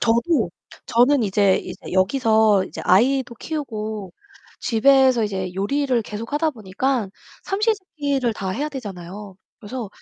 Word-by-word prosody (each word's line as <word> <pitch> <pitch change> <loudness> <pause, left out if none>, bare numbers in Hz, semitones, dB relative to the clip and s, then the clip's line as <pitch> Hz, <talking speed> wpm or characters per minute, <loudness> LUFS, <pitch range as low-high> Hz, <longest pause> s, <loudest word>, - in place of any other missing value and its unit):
저도 235 - +2 0.4
저는 250 +3 +4
이제 200 -1 +3
이제 - - -7
여기서 215 0 +3
이제 - - -8
아이도 245 +5 +3
키우고 220 - -5 0.5
집에서 260 0 +4
이제 190 -3 -3
요리를 255 +6 0
계속하다 230 +10 -2
보니깐 225 0 -2 0.3
3 390 +1 -3
시 445 +1 +4
3 385 -3 -18
끼를 275 -5 0
다 195 -3 -4
해야 285 +11 -2
되잖아요. 200 - -8 0.2
그래서 230 0 -6
230 Hz, 280 characters per minute, -22 LUFS, 205-275 Hz, 0.5 s, 저는